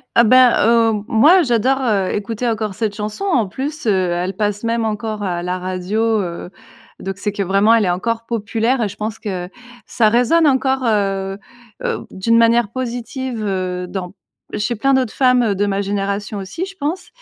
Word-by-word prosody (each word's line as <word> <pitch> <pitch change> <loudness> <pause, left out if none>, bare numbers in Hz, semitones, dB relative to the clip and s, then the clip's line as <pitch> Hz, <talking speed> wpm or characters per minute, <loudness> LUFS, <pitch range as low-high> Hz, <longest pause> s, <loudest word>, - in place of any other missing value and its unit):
Ah, 235 - +6
ben, 255 +2 +6 0.2
heu, 225 -3 +3
moi 305 +12 +5
j'adore, 260 -1 +1
heu, 205 -7 +1
écouter 220 +3 -3
encore 215 -3 -2
cette 215 0 -2
chanson 210 - -5
en 255 - +1
plus, 290 +7 -5
heu, 185 -3 +2
elle 180 +2 -2
passe 205 +1 -2
même 230 0 0
encore 215 -1 -3
à 175 -2 -2
la 180 +1 -2
radio, 185 +4 -2 0.2
heu, 175 0 -6 0.5
donc 195 0 -5
c'est 205 +1 -2
que 205 - -4
vraiment 195 +4 +3
elle 225 -3 +3
est - - +1
encore 230 +6 -2
populaire 230 +2 -1
et 205 - -1
je 200 - -11
pense 215 +1 -4
que 185 -4 -4 0.4
ça 220 -3 +2
résonne 250 +8 +3
encore, 265 -1 +1
heu 195 -3 0 0.5
heu, - - -2
d'une 230 +5 +1
manière 230 -1 +3
positive, 250 -1 -4
heu, 180 -1 -2
dans 180 -1 -5 0.5
chez 210 +3 -1
plein 270 +5 +1
d'autres 260 -4 +1
femmes, 250 -2 +3
heu, 205 - 0
de 205 +2 0
ma 200 -1 -1
génération 200 +1 -3
aussi, 195 - -5
je 390 0 -11
pense 315 +5 -3
215 Hz, 190 wpm, -18 LUFS, 195-240 Hz, 0.5 s, Ah